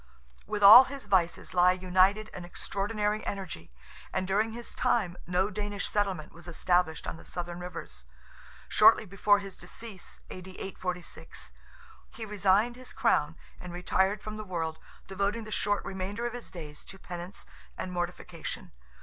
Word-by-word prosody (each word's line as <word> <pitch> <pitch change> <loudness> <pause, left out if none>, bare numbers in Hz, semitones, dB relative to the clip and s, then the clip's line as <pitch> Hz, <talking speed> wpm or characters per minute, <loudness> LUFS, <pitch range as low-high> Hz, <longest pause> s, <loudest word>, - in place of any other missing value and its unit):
With 205 - -2
all 220 +6 +12
his 275 0 -7
vices 175 -3 +1
lie 180 0 +6
united 185 +4 +3
an 180 - -7
extraordinary 210 +4 -2
energy, 180 - -5 0.4
and 190 - -1
during 210 +4 +2
his 235 +1 -7
time, 185 -7 +1
no 185 +3 +1
Danish 205 0 -3
settlement 195 -7 -1
was 175 +1 -13
established 175 -1 +1
on - - -4
the - - -13
Southern 175 0 -5
rivers. 65 - -7 0.6
Shortly - - +6
before 205 +1 +3
his 195 -2 -7
decease 195 +2 -8
(A.D. 185 0 -8
846) 180 -2 -5 0.6
he 225 - -7
resigned 210 +3 +2
his 255 0 -11
crown 150 +2 +2 0.2
and 180 - -8
retired 190 +3 +1
from 215 0 -5
the 215 - -5
world, 165 -5 -3 0.3
devoting 200 +4 -1
the 215 - -9
short 205 -1 0
remainder 195 +5 -3
of 240 - -2
his 245 -1 -7
days 150 -4 -9
to 195 - -10
penance 180 0 -7 0.3
and 185 - -4
mortification. 175 -1 -5
190 Hz, 150 wpm, -30 LUFS, 175-210 Hz, 0.6 s, all